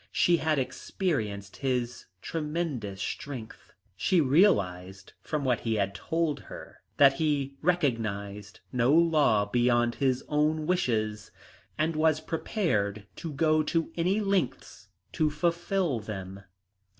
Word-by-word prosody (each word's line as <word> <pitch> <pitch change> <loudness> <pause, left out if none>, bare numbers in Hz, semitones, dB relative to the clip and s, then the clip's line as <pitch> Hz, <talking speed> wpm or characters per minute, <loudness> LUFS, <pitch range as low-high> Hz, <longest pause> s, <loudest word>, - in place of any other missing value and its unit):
She 175 -1 +3
had 155 -2 +1
experienced 110 - -3
his 125 -3 -2 0.2
tremendous 150 - -3
strength. 120 +1 -6 0.2
She 180 - +2
realised 100 - +2
from 150 -2 -3
what 125 -3 +2
he 115 -1 -1
had 100 -2 0
told 165 +3 -1
her - - -11 0.2
that 140 -1 +7
he 140 -2 0
recognised 110 - -1
no 125 +1 +3
law 155 -10 +4
beyond 120 +2 +2
his 130 -1 0
own 150 +1 +1
wishes, 110 - 0 0.5
and 160 +1 0
was 155 0 +3
prepared 110 - -1
to 165 - -5
go 155 +2 +2
to 165 +2 -1
any 180 +5 +1
lengths 135 - -2 0.2
to 155 -2 +1
fulfil 170 -1 0
them. 100 -2 -7
140 Hz, 120 wpm, -28 LUFS, 110-160 Hz, 0.5 s, that